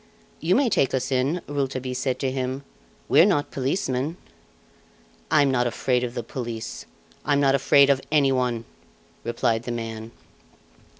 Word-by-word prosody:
"You 170 +3 +2
may 275 0 +3
take 135 - +2
us 130 +1 -2
in," 135 +7 0
Rouletabille 135 -3 -2
said 125 0 -1
to 135 -2 0
him, 130 +1 -3 0.4
"we - - +6
are - - +7
not 145 -8 +1
policemen." 135 +1 -1 1.1
"I'm 145 -3 +4
not 125 -2 +2
afraid 125 +1 0
of 120 0 -4
the 120 - -3
police 115 -1 -6 0.4
I'm 145 -1 +2
not 135 -1 +4
afraid 140 +1 +5
of 135 -1 +1
anyone!" 130 -5 +2 0.6
replied 115 -1 0
the 120 - -5
man. 115 -1 -5
130 Hz, 145 wpm, -24 LUFS, 125-140 Hz, 1.1 s, are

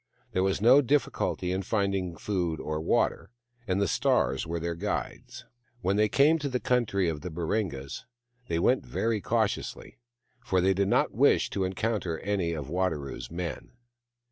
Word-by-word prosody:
There 95 - 0
was 95 +1 0
no 125 +6 +7
difficulty 135 -9 0
in 95 +1 -1
finding 95 -4 -1
food 90 -5 -2
or 75 0 -3
water, 80 - +1 0.4
and 95 0 +1
the 100 - +2
stars 65 -4 +1
were 85 +1 -2
their 85 +1 -2
guides. 100 +5 -4 0.4
When 95 +2 +1
they 105 +1 +3
came 150 +7 +4
to 145 -1 -2
the 125 -1 -1
country 105 -6 +1
of 80 -3 -2
the 90 - -5
Baringas 85 - -3 0.4
they 80 - -1
went 125 +10 +2
very 110 -2 -1
cautiously, - - -2 0.4
for 95 -5 +1
they 95 +2 +3
did 100 +1 +1
not - - +2
wish - - +3
to 95 - 0
encounter 95 -3 -1
any 95 -4 -1
of 75 -4 -5
Wadaro's 80 -4 -2
men. 85 -1 -5
95 Hz, 165 wpm, -28 LUFS, 85-105 Hz, 0.4 s, no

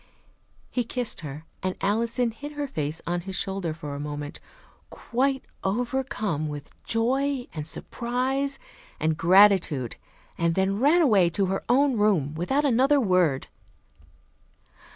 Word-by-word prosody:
He 245 - 0
kissed 245 0 -1
her, 150 0 -7 0.2
and 185 0 -2
Alison 230 +4 0
hid 290 +6 -8
her 290 -1 -3
face 155 - -4
on 175 0 -1
his 190 +2 -6
shoulder 190 -2 -2
for 150 -2 -6
a 140 - -5
moment, 145 0 -5 0.5
quite 265 +2 -1 0.2
overcome 215 - -1
with 145 -1 -7
joy 260 +3 +1
and 150 -2 -5
surprise 260 +9 -2 0.4
and 160 0 +1
gratitude, 175 - +4 0.4
and 170 0 +1
then 195 +1 +1
ran 310 +7 +5
away 200 - +4
to 195 +4 +1
her 195 +1 -2
own 265 0 +3
room 190 -9 +2
without 265 - 0
another 270 +3 +4
word. 180 - +2
200 Hz, 130 wpm, -26 LUFS, 165-255 Hz, 0.5 s, ran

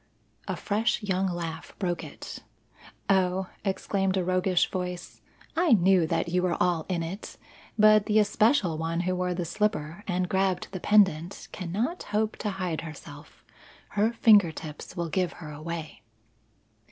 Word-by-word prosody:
A - - -2
fresh 220 +2 0
young 190 -1 0
laugh 170 -2 -5
broke 175 -3 -2
it. - - -8 0.7
"Oh," 190 -1 +1
exclaimed 195 -1 0
a 185 - +1
roguish 185 0 +2
voice, 180 -1 -5 0.3
"I 330 -5 +4
knew 185 -4 +4
that 165 +1 0
you 180 +1 +1
were 180 -1 0
all 175 -3 +1
in 175 -3 0
it! 185 +6 -7 0.4
But 215 -1 +6
the 215 -1 +3
especial 210 - +3
one 165 +1 -1
who 185 +1 -1
wore 180 0 -1
the 175 -1 -2
slipper 170 -1 -2
and 180 -1 0
grabbed 190 -1 0
the 190 - -5
pendant 190 -4 +2
cannot 210 - -3
hope 215 +1 -1
to 210 - -2
hide 180 -4 -2
herself. 150 -2 -11 0.4
Her 210 +2 +1
finger 210 -7 +5
tips 155 +3 -9
will 170 -1 -2
give 180 +1 0
her 155 -3 -9
away." 155 +1 -6
185 Hz, 155 wpm, -27 LUFS, 170-205 Hz, 0.7 s, But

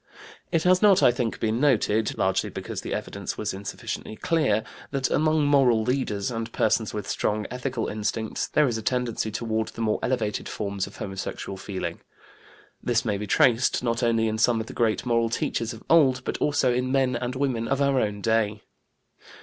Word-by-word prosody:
It 165 -2 +2
has 180 0 +4
not, 200 -2 +5
I - - +7
think, 120 -2 -2
been 110 +1 0
noted 110 -6 +2
largely - - +1
because - - -6
the - - -6
evidence - - -4
was - - -2
insufficiently 100 +2 -6
clear 130 - +1 0.3
that 135 -2 -1
among 155 0 +2
moral 130 -6 +4
leaders, 110 -4 -1
and 115 0 -4
persons 110 -1 +1
with 105 - -5
strong 105 0 -1
ethical 125 -2 -3
instincts, 110 +1 -2
there 150 -1 +3
is 115 -3 -1
a - - -6
tendency 120 -1 -1
toward 110 0 -2
the - - -7
more 110 -1 +1
elevated 115 -5 -1
forms 100 -2 -3
of 100 - -13
homosexual 95 0 -5
feeling. 95 0 -5 0.8
This 120 -1 0
may 105 -3 0
be 105 - -4
traced, 120 +4 +3
not 115 0 0
only 115 -2 +2
in 110 0 -2
some 115 0 +3
of 110 - -3
the - - -9
great 115 0 0
moral 115 -1 +2
teachers 115 0 -1
of 115 -2 -10
old, 135 -6 +4
but - - -3
also 145 -4 +2
in 125 +1 -1
men 130 -2 +2
and 120 +1 -3
women 130 -4 -1
of 135 0 0
our 140 -1 +3
own 105 -1 -2
day. 110 -1 +1
115 Hz, 190 wpm, -25 LUFS, 110-130 Hz, 0.8 s, I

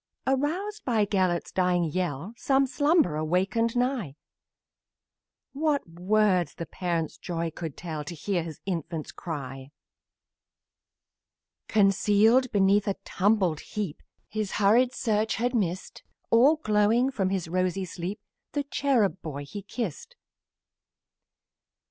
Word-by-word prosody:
Aroused 345 +11 -1
by 225 -5 +2
Gelert's 185 -4 0
dying 180 -1 +2
yell, 170 +2 -2
Some 270 +3 +2
slumberer 285 - +2
wakened 195 +8 +1
nigh; 245 - -1 1.4
What 290 - 0
words 180 -1 +1
the 170 - -5
parent's 170 -3 -3
joy 170 -2 -3
can 160 -2 -6
tell 155 -2 -5
To 170 - -6
hear 180 +3 -1
his 160 -2 -7
infant 165 -4 -4
cry! 135 -5 -6 2.0
Concealed 215 +4 +4
beneath 200 0 +3
a 200 - +1 0.2
mangled 190 -5 +3
heap 205 -8 -5 0.3
His 215 -2 -3
hurried 230 +5 +4
search 220 -2 0
had 245 +2 0
missed, 185 -6 -2 0.3
All 260 +7 +6
glowing 225 -1 +2
from 195 -7 0
his 190 -4 -2
rosy 185 +2 0
sleep, 180 +4 -5 0.4
His 290 - +1
cherub 230 -10 +1
boy 145 -2 -6
he 205 +8 -7
kissed. 255 - -5
195 Hz, 115 wpm, -27 LUFS, 170-235 Hz, 2.0 s, All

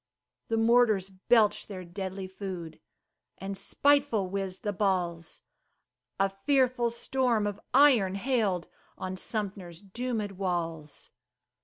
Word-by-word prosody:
The 225 - 0
mortars 225 -4 +3
belched 210 +3 +2
their 185 -3 -7
deadly 190 +2 -5
food, 185 -4 -7 0.6
And 195 +1 -5
spiteful 280 -5 +2
whizzed 195 -1 -4
the 205 -1 -1
balls, 180 -4 -1 0.8
A 195 - +4
fearful 245 +4 +1
storm 235 -2 0
of 205 0 -3
iron 250 -9 +5
hailed 200 -6 0 0.3
On 185 0 -4
Sumter's 190 -3 -5
doomèd 220 0 -3
walls. 170 -5 -4
195 Hz, 110 wpm, -29 LUFS, 185-230 Hz, 0.8 s, iron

